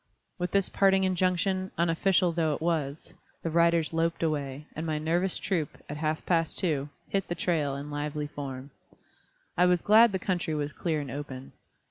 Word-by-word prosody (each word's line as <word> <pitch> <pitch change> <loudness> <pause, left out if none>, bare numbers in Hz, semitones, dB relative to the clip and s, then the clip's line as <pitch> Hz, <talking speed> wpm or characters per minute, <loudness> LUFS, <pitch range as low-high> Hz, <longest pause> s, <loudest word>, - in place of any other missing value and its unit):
With 180 0 -1
this 195 +1 +2
parting 195 -1 +3
injunction, 185 +1 +1
unofficial 175 +2 +2
though 160 -3 +1
it - - -9
was, 155 -3 -2 0.3
the 165 - -2
riders 170 -1 +3
loped 165 +1 0
away, 145 -2 -2
and 160 - -4
my 155 -2 -1
nervous 170 +4 +1
troop, 165 -6 -2
at 150 - -5
half 155 0 -2
past 165 -2 +1
two, 150 -5 0 0.2
"hit 195 -1 -1
the 175 - -2
trail" 150 -7 0
in 145 +1 -6
lively 150 0 -3
form. 140 -2 -7 0.8
I 180 +1 +4
was 180 -2 +2
glad 225 +2 +7
the 190 - 0
country 175 -4 -1
was 145 -1 -2
clear 160 -4 -1
and 140 -4 -6
open. 135 -2 -7
165 Hz, 175 wpm, -28 LUFS, 150-180 Hz, 0.8 s, glad